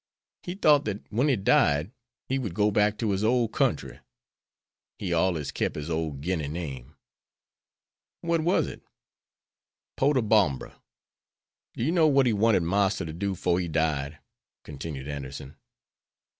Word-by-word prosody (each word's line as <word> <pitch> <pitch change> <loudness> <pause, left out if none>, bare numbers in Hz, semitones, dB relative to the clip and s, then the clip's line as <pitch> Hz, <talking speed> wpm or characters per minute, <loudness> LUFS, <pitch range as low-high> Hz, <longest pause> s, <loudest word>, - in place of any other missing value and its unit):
He 175 - -6
thought 150 -6 +4
dat 105 -1 -3
when 120 +7 +1
he 140 - +3
died 75 -4 +2 0.4
he 135 +1 0
would 105 -10 -4
go 105 0 +2
back 105 +1 +2
to 110 -3 -1
his 100 +1 -1
ole 120 +1 +3
country. - - -1 1.0
He 90 -4 -3
allers 80 -4 0
kep' - - -2
his 75 +2 -5
ole 80 -1 -1
Guinea 75 +2 -3
name." 75 -3 -6 1.3
"What 170 -1 0
was 175 +4 +2
it?" - - -8 1.2
"Potobombra. 110 - +2 0.9
Do - - -3
you 150 - +1
know 165 -3 +4
what 140 -2 +4
he 120 - +2
wanted 105 -3 +3
Marster 95 +2 +1
to 80 - -6
do 95 +3 -2
'fore 90 0 +1
he 90 - -2
died?" 75 -2 -1 0.5
continued 70 -1 -7
Anderson. 70 -1 -7
95 Hz, 145 wpm, -27 LUFS, 75-115 Hz, 1.3 s, thought